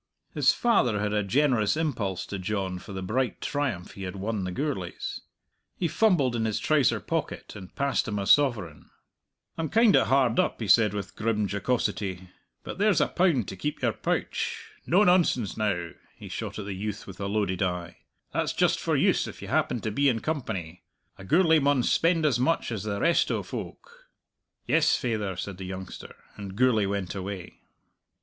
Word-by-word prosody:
His -, -, +4 dB
father 125 Hz, -, +2 dB
had 105 Hz, 0 st, -1 dB
a 105 Hz, -, +2 dB
generous 120 Hz, +2 st, +2 dB
impulse 115 Hz, -, -2 dB
to 100 Hz, -, -5 dB
John 95 Hz, -1 st, -2 dB
for 100 Hz, -, -11 dB
the 95 Hz, -1 st, -5 dB
bright 125 Hz, +6 st, -1 dB
triumph 130 Hz, -11 st, -2 dB
he 100 Hz, -, -11 dB
had 95 Hz, 0 st, -5 dB
won 100 Hz, 0 st, -3 dB
the 90 Hz, -, -3 dB
Gourlays. 125 Hz, -, -4 dB, 0.6 s
He 175 Hz, -, 0 dB
fumbled 165 Hz, -, +2 dB
in 110 Hz, -1 st, 0 dB
his 110 Hz, -2 st, -1 dB
trouser 150 Hz, -6 st, +2 dB
pocket, -, -, -4 dB
and 95 Hz, -3 st, -11 dB
passed 140 Hz, -1 st, 0 dB
him 105 Hz, -1 st, -2 dB
a 100 Hz, -, -2 dB
sovereign. 105 Hz, -, +2 dB, 0.7 s
"I'm 160 Hz, -, -1 dB
kind 225 Hz, -2 st, +5 dB
o' -, -, +5 dB
hard 130 Hz, -3 st, +2 dB
up," -, -, +1 dB
he 110 Hz, -, -3 dB
said, 105 Hz, -1 st, +5 dB
with 100 Hz, -, -5 dB
grim 105 Hz, -2 st, 0 dB
jocosity, 100 Hz, -3 st, -2 dB, 0.3 s
"but -, -, -7 dB
there's 205 Hz, -2 st, +3 dB
a -, -, +2 dB
pound 165 Hz, -, +2 dB
to -, -, -6 dB
keep 145 Hz, +11 st, -4 dB
your -, -, +2 dB
pouch. -, -, -3 dB, 0.2 s
No 185 Hz, +6 st, +5 dB
nonsense 175 Hz, -, +3 dB
now!" 90 Hz, -6 st, -1 dB, 0.2 s
he -, -, -11 dB
shot -, -, -5 dB
at 105 Hz, -, -5 dB
the 100 Hz, -, -4 dB
youth 100 Hz, +2 st, -5 dB
with 95 Hz, -2 st, -11 dB
a 100 Hz, -, -2 dB
loaded 100 Hz, -3 st, -1 dB
eye. 90 Hz, -2 st, -2 dB, 0.4 s
"That's -, -, 0 dB
just -, -, +2 dB
for -, -, 0 dB
use -, -, +2 dB
if -, -, -9 dB
you -, -, -8 dB
happen 120 Hz, -, +1 dB
to 110 Hz, -, -2 dB
be 140 Hz, +6 st, +3 dB
in 115 Hz, -3 st, 0 dB
company. 95 Hz, -, -4 dB, 0.4 s
A -, -, -9 dB
Gourlay 160 Hz, -, +4 dB
maun 140 Hz, -3 st, +2 dB
spend 165 Hz, +2 st, +2 dB
as 130 Hz, -6 st, +2 dB
much 165 Hz, +1 st, +1 dB
as 110 Hz, -4 st, -3 dB
the 100 Hz, -1 st, -2 dB
rest 170 Hz, 0 st, +3 dB
o' -, -, -1 dB
folk." -, -, -9 dB, 0.6 s
"Yes, 160 Hz, -1 st, +3 dB
faither," 110 Hz, -7 st, -2 dB
said 95 Hz, +1 st, -5 dB
the 95 Hz, -, -5 dB
youngster, 95 Hz, 0 st, -8 dB, 0.2 s
and 100 Hz, -2 st, -7 dB
Gourlay 110 Hz, -3 st, +3 dB
went 100 Hz, -3 st, -3 dB
away. 95 Hz, -2 st, -6 dB
110 Hz, 190 wpm, -27 LUFS, 95-145 Hz, 0.7 s, kind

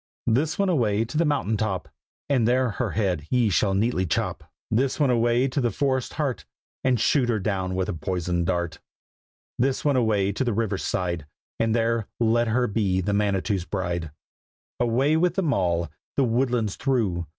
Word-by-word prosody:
This 145 Hz, +8 st, +1 dB
one 200 Hz, -, +2 dB
away 115 Hz, -, +2 dB
to 120 Hz, -, -9 dB
the 165 Hz, +2 st, +3 dB
mountain 135 Hz, -7 st, 0 dB
top, 100 Hz, -3 st, -2 dB, 0.4 s
And 130 Hz, -6 st, +2 dB
there 125 Hz, 0 st, +2 dB
her -, -, -2 dB
head 90 Hz, -8 st, -1 dB
ye 120 Hz, -4 st, +2 dB
shall 95 Hz, +2 st, +2 dB
neatly 100 Hz, -3 st, +1 dB
chop. -, -, -1 dB, 0.3 s
This 130 Hz, +7 st, +1 dB
one 140 Hz, -4 st, +3 dB
away 120 Hz, +2 st, +2 dB
to 140 Hz, +2 st, -1 dB
the 120 Hz, -, +2 dB
forest's 130 Hz, -1 st, -1 dB
heart, 145 Hz, -5 st, -2 dB, 0.4 s
And 130 Hz, -3 st, +2 dB
shoot 125 Hz, +2 st, +2 dB
her 115 Hz, -, +2 dB
down 95 Hz, -2 st, -2 dB
with 95 Hz, 0 st, -1 dB
a -, -, -2 dB
poisoned 85 Hz, 0 st, -2 dB
dart. 85 Hz, -4 st, -1 dB, 0.8 s
This 130 Hz, +3 st, 0 dB
one 145 Hz, -2 st, +3 dB
away 105 Hz, -5 st, +2 dB
to 105 Hz, -, -1 dB
the 120 Hz, -3 st, 0 dB
river 105 Hz, -3 st, -1 dB
side, 85 Hz, -6 st, -2 dB, 0.3 s
And 115 Hz, 0 st, +2 dB
there 115 Hz, -2 st, +1 dB
let 120 Hz, 0 st, +2 dB
her 120 Hz, +3 st, +2 dB
be 100 Hz, -4 st, 0 dB
the 100 Hz, +3 st, -1 dB
Manitou's 100 Hz, -2 st, 0 dB
bride. 85 Hz, -4 st, -3 dB, 0.7 s
Away 125 Hz, +6 st, +2 dB
with 175 Hz, +1 st, +2 dB
them 170 Hz, -7 st, +1 dB
all, 85 Hz, -4 st, 0 dB, 0.3 s
the 140 Hz, -, +4 dB
woodlands 120 Hz, -3 st, 0 dB
through. 105 Hz, -, 0 dB
115 Hz, 180 wpm, -25 LUFS, 95-130 Hz, 0.8 s, the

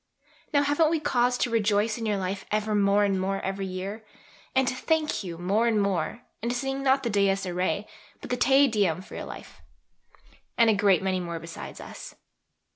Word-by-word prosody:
Now, 285 Hz, -2 st, +3 dB
haven't 290 Hz, +2 st, +3 dB
we 325 Hz, 0 st, +1 dB
cause 245 Hz, -4 st, +1 dB
to 245 Hz, -, 0 dB
rejoice 215 Hz, 0 st, +1 dB
in 225 Hz, -, -3 dB
your 210 Hz, -1 st, +1 dB
life 190 Hz, +1 st, -3 dB
ever 215 Hz, 0 st, 0 dB
more 200 Hz, 0 st, +3 dB
and 195 Hz, -2 st, +1 dB
more 195 Hz, +1 st, -1 dB
every 195 Hz, 0 st, -3 dB
year, 195 Hz, +4 st, -5 dB, 0.5 s
and 265 Hz, -1 st, +3 dB
to 255 Hz, -, +1 dB
thank 310 Hz, 0 st, 0 dB
you 170 Hz, -3 st, -6 dB
more 200 Hz, +7 st, +1 dB
and 220 Hz, -2 st, +2 dB
more, 200 Hz, +3 st, -1 dB, 0.2 s
and 235 Hz, -, -2 dB
to 245 Hz, -, -1 dB
sing 270 Hz, +1 st, -2 dB
not 270 Hz, 0 st, +3 dB
the 235 Hz, -, 0 dB
Dies 200 Hz, -1 st, +2 dB
Iræ 180 Hz, +1 st, -1 dB, 0.3 s
but -, -, -9 dB
the -, -, +2 dB
Te 270 Hz, +2 st, +5 dB
Deum 195 Hz, -7 st, 0 dB
for -, -, -14 dB
your -, -, -5 dB
life. -, -, -11 dB, 1.0 s
And 230 Hz, -2 st, +6 dB
a -, -, +3 dB
great 200 Hz, -3 st, +3 dB
many 190 Hz, -1 st, 0 dB
more 170 Hz, -2 st, -4 dB
besides 165 Hz, +1 st, -9 dB
us. -, -, -10 dB
210 Hz, 200 wpm, -27 LUFS, 190-245 Hz, 1.0 s, And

